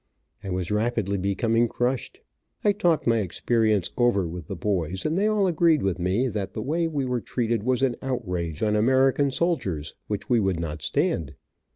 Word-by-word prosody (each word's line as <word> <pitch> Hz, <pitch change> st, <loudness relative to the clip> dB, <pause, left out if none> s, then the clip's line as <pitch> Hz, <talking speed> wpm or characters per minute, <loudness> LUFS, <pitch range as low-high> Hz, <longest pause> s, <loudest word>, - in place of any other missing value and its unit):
I 100 Hz, -, -5 dB
was 90 Hz, 0 st, -2 dB
rapidly 105 Hz, -2 st, 0 dB
becoming 115 Hz, +5 st, +1 dB
crushed. 125 Hz, +2 st, -2 dB, 0.4 s
I 205 Hz, -, +5 dB
talked 175 Hz, -6 st, +1 dB
my 115 Hz, -1 st, +3 dB
experience 110 Hz, +1 st, +1 dB
over 120 Hz, -7 st, +2 dB
with 85 Hz, -2 st, -7 dB
the 95 Hz, -, -4 dB
boys, 95 Hz, -1 st, -2 dB
and 155 Hz, -, 0 dB
they 200 Hz, +3 st, +2 dB
all 215 Hz, -2 st, +2 dB
agreed 165 Hz, -3 st, +3 dB
with 95 Hz, -2 st, 0 dB
me 95 Hz, +9 st, +1 dB
that 105 Hz, -4 st, -4 dB
the 110 Hz, -, -2 dB
way 165 Hz, +5 st, 0 dB
we 145 Hz, -4 st, -2 dB
were 125 Hz, -2 st, -1 dB
treated 115 Hz, +1 st, -1 dB
was 130 Hz, +3 st, 0 dB
an 125 Hz, -3 st, +2 dB
outrage 90 Hz, -, -3 dB
on 105 Hz, -1 st, +2 dB
American 130 Hz, +5 st, +3 dB
soldiers, 115 Hz, -, -1 dB
which 105 Hz, -2 st, -4 dB
we 120 Hz, -2 st, +3 dB
would 95 Hz, -4 st, 0 dB
not 80 Hz, -2 st, -4 dB
stand. 70 Hz, 0 st, -1 dB
115 Hz, 185 wpm, -25 LUFS, 95-130 Hz, 0.4 s, I